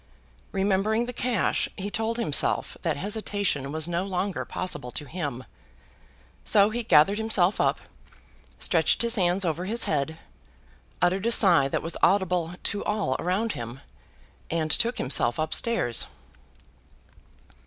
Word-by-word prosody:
Remembering 200 +4 +1
the 250 - -6
cash, 240 -4 0
he 200 +2 -4
told 225 +2 -1
himself 225 -12 +1
that - - -1
hesitation 200 -6 -1
was 160 +1 +1
no 175 +1 -1
longer 195 0 -2
possible 180 -9 -4
to 150 - -4
him. 145 -6 -5 1.0
So 205 +1 +4
he 240 +2 -2
gathered 205 -2 +4
himself 210 -4 +2
up, - - +1 0.8
stretched - - +2
his 235 -1 +1
hands 185 -2 +2
over 170 +2 -2
his 230 +5 0
head, 155 +1 -1 0.9
uttered 190 +5 +2
a - - +2
sigh 175 -11 +5
that - - -2
was 165 - -2
audible 180 -3 +2
to 205 - 0
all 210 -11 -1
around 195 +6 0
him, 120 -1 -7 0.7
and 160 -1 -1
took 235 +5 0
himself 120 -2 0
up 155 0 -1
stairs. 225 - +1
185 Hz, 135 wpm, -26 LUFS, 160-215 Hz, 1.0 s, sigh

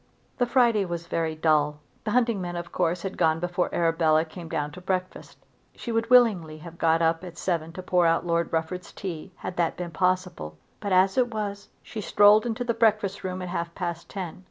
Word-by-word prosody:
The 245 - +2
Friday 235 -4 +3
was 170 -2 -4
very 160 -2 -2
dull. 150 -2 +2 0.3
The - - -1
hunting 235 -3 +2
men 175 -1 -4
of 175 0 -6
course 175 -1 0
had 195 -1 -5
gone 160 -2 +3
before 175 +1 -1
Arabella 165 -1 +2
came 165 0 -10
down 150 -3 -2
to 180 - -11
breakfast. 185 0 -4 0.4
She 235 - -6
would 225 0 0
willingly 205 -11 +4
have 170 +2 -12
got 165 0 +3
up 165 +1 +1
at 175 -2 -9
seven 165 -3 -2
to 185 - -7
pour 180 -2 +3
out 165 +1 +2
Lord 170 -1 0
Rufford's 165 +2 -3
tea, 185 -1 -6
had 180 - -7
that 170 -2 0
been 175 -1 -5
possible; 180 - -1 0.2
but, 200 -2 -4
as 190 +5 +4
it 245 -1 +2
was, 205 -2 -4
she 215 - -6
strolled 205 +3 +5
into 235 +1 -2
the 240 -1 0
breakfast 215 -3 +1
room 185 0 -4
at 180 - -5
half 170 -1 -4
past 170 -2 -4
ten. 185 -2 -6
180 Hz, 205 wpm, -26 LUFS, 165-200 Hz, 0.4 s, strolled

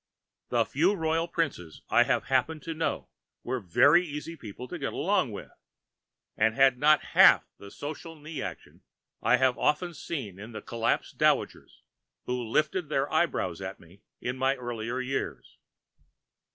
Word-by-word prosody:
The - - +2
few 175 +9 +2
Royal 165 -1 0
Princes 140 - -3
I - - +6
have - - +1
happened 135 +3 0
to 165 - -4
know 160 +1 -2 0.4
were 130 - -2
very 145 - +5
easy 155 0 -6
people 125 -2 -9
to - - -6
get - - -3
along - - +1
with, - - -8 0.8
and 110 0 +2
had 135 -1 +4
not 150 +1 +5
half - - +7
the 100 - -11
social 155 +7 -7
knee 155 0 -9
[Pg - - -2
538]action - - -22 0.4
I 125 - +4
have 130 -1 +2
often 170 +4 +1
seen 130 - -6
in 110 +3 -9
the 110 - -6
collapsed 115 0 -2
dowagers - - 0 0.4
who 125 0 -2
lifted 150 +7 0
their 140 0 -1
eyebrows 135 - 0
at 95 0 -6
me 90 +4 -19 0.2
in 125 +1 -3
my 135 +1 +2
earlier 120 -1 -4
years. 125 - -4
135 Hz, 160 wpm, -28 LUFS, 115-155 Hz, 0.8 s, half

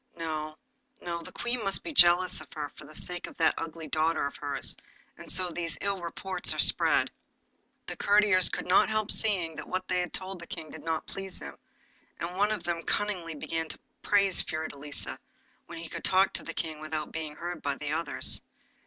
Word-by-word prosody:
No, 155 -2 -3 0.4
no, 170 -1 -4
the - - -10
Queen 240 -1 -2
must 195 -1 0
be 325 - -5
jealous 175 -4 +6
of - - -14
her 150 -2 -4
for 150 - -14
the 155 +2 -11
sake 175 -1 +2
of - - -12
that 160 -1 +4
ugly 165 -1 -5
daughter 160 -1 +1
of 140 - -4
hers, 145 -1 -1 0.4
and - - -11
so 180 +1 +2
these 165 -2 -3
evil 200 -2 -1
reports 180 +2 -2
are - - -7
spread.' - - +4 0.7
The - - -5
courtiers 205 -2 +5
could - - -4
not 180 +4 +5
help 215 -1 +2
seeing 180 -7 +2
that - - -6
what 185 0 -2
they 180 -1 +1
had 180 -2 -2
told 190 -1 -4
the 170 - -8
King 165 -5 -7
did - - -9
not 160 -1 -1
please 195 -1 -3
him, 70 0 -8 0.6
and 175 +2 -4
one 205 +3 +3
of 215 - -2
them 170 -1 -1
cunningly 180 -5 -2
began 160 +2 -3
to - - -7 0.2
praise 200 -3 +4
Fiordelisa, 150 -2 -4 0.5
when 170 - -8
he 165 0 -6
could - - -6
talk 190 +1 +4
to - - -2
the - - -6
King 155 -2 -4
without 155 -1 -3
being 155 -2 -5
heard 175 0 -5
by 140 -1 -1
the 150 +1 -4
others. 165 +2 +1
170 Hz, 205 wpm, -29 LUFS, 155-190 Hz, 0.7 s, jealous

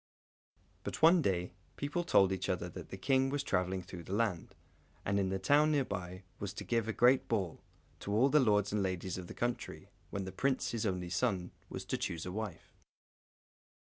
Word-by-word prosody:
But, - - -5
one 170 +2 +8
day, 90 - 0 0.2
people 145 +5 -2
told 95 - +4
each 95 -1 -2
other 90 -1 -1
that - - -9
the 95 - -6
King 135 +5 +2
was 140 0 -1
travelling 95 -4 0
through 90 -1 -8
the 95 - -3
land, 105 -7 -1 0.5
and 100 +1 +1
in 95 -1 +1
the 95 - 0
town 145 +10 +4
near 140 -3 +2
by 90 -2 -5 0.2
was 100 -1 -4
to - - -5
give 115 -2 0
a - - +1
great 125 +4 +4
ball, 95 -7 -1 0.4
to 100 - -5
all 115 +6 +5
the 150 - +5
lords 105 -5 +3
and 105 - +1
ladies 95 -1 -2
of 90 - -7
the - - -9
country, 120 0 -3 0.2
when 100 - -3
the 95 - -5
Prince, 130 +7 0
his 115 -2 -1
only 90 -2 -2
son, 95 -7 0 0.2
was - - -6
to - - -2
choose 80 -2 -3
a 90 - -4
wife. 105 -2 -6
100 Hz, 200 wpm, -33 LUFS, 90-125 Hz, 0.5 s, one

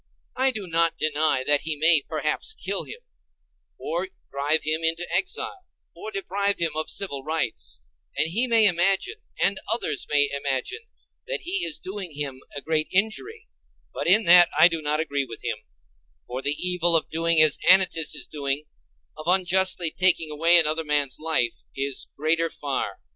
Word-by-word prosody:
I 265 +1 +3
do 220 -6 -5
not 165 -1 +1
deny 155 -3 0
that 145 0 +3
he 160 -1 -3
may, 160 +1 +4
perhaps, 155 - -3
kill - - -3
him, 485 - -10 0.8
or 175 +4 -2 0.2
drive 145 +3 +1
him 155 +1 -1
into 165 +2 0
exile, 375 0 -2 0.3
or 420 - -7
deprive 200 - -1
him 170 -2 -1
of 155 0 -2
civil 140 -9 -2
rights; 155 - -2 0.4
and 160 - +1
he 235 +8 0
may 230 -2 +4
imagine, 195 - +1 0.2
and 195 0 +2
others 155 - -1
may 145 -1 +4
imagine, 140 - -3 0.4
that - - -3
he 360 +2 -1
is 315 -3 -1
doing 190 -4 -7
him 140 -3 -5
a 145 - -5
great 155 0 -1
injury: 390 - -1 0.5
but - - -4
in 205 +6 +5
that 175 0 +7
I - - +8
do 165 -2 -3
not 150 0 -1
agree 140 -3 -1
with 115 -3 -10
him; 115 -3 -3 0.7
for 125 +2 -5
the 145 +2 -1
evil 180 -2 +1
of 160 - 0
doing 165 0 +1
as 155 -2 +4
Anytus 180 -5 +4
is - - -7
doing—of 135 - -7
unjustly 185 -2 +2
taking 170 -3 +2
away 165 +3 +5
another 160 0 +2
man's 145 -3 -1
life—is 135 - -2
greater 165 +2 +1
far. 140 -3 -4
165 Hz, 165 wpm, -24 LUFS, 145-190 Hz, 0.8 s, I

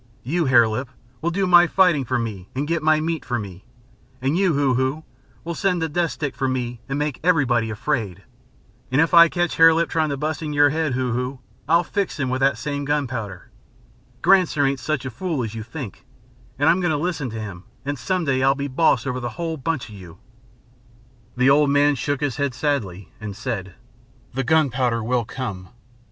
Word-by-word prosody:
You, 165 +6 0
Hare 120 -4 +5
Lip, 125 +4 -3 0.3
will 170 - 0
do 190 +3 0
my 175 -1 +6
fighting 175 -7 +3
for 125 +1 0
me 105 -6 -5
and 140 +3 -2
get 165 0 0
my 155 0 +3
meat 160 0 -2
for 120 -1 -2
me, 95 -3 -8 0.5
and 135 +4 0
you, 185 -2 +2
Hoo 140 -2 +2
Hoo, 130 +5 -1 0.4
will 170 - -4
send 180 +1 0
the 160 - 0
death 170 +2 0
stick 145 -3 -4
for 135 - -1
me 125 -2 -3
and 135 - -1
make 150 -2 -2
everybody 130 -10 +2
afraid. 110 - -3 0.7
And 130 - +2
if 160 +3 +2
I 170 -1 +8
catch 175 0 -1
Hare 165 0 +7
Lip 165 0 +1
trying 160 -1 0
to 140 - -2
bust 155 +2 -3
your 145 -2 +3
head, 155 -2 -1
Hoo 130 -1 -1
Hoo, 125 +2 -3 0.3
I'll 170 +2 +4
fix 200 -5 -3
him 130 -2 -1
with 130 - -1
that 135 +1 +2
same 145 -1 -3
gunpowder. 125 - -3 0.7
Granser 180 -7 +4
ain't 135 0 0
such 130 +1 -2
a 130 - -4
fool 160 0 -3
as 110 -2 -5
you 115 - -5
think, 115 - -8 0.5
and 145 +3 +2
I'm 175 - +4
going 175 - +1
to 155 - +1
listen 155 -4 -2
to 110 0 -6
him 95 -4 -8 0.2
and 145 -1 -3
some 185 +6 -1
day 130 -2 +1
I'll 135 +1 +4
be 140 0 -3
boss 135 -3 +2
over 125 -1 -2
the 120 -1 -4
whole 165 -2 -2
bunch 160 -1 -3
of 110 - -12
you." 90 -4 -12 1.2
The 125 +2 +4
old 145 0 +4
man 145 +1 +4
shook 145 +2 -2
his 145 -4 -1
head 140 -3 -1
sadly, 105 - -2
and 105 -2 -6
said: 95 -7 -5 0.6
"The 135 +1 -1
gunpowder 125 -5 +1
will 120 0 0
come. 100 -8 -6
140 Hz, 205 wpm, -22 LUFS, 120-160 Hz, 1.2 s, I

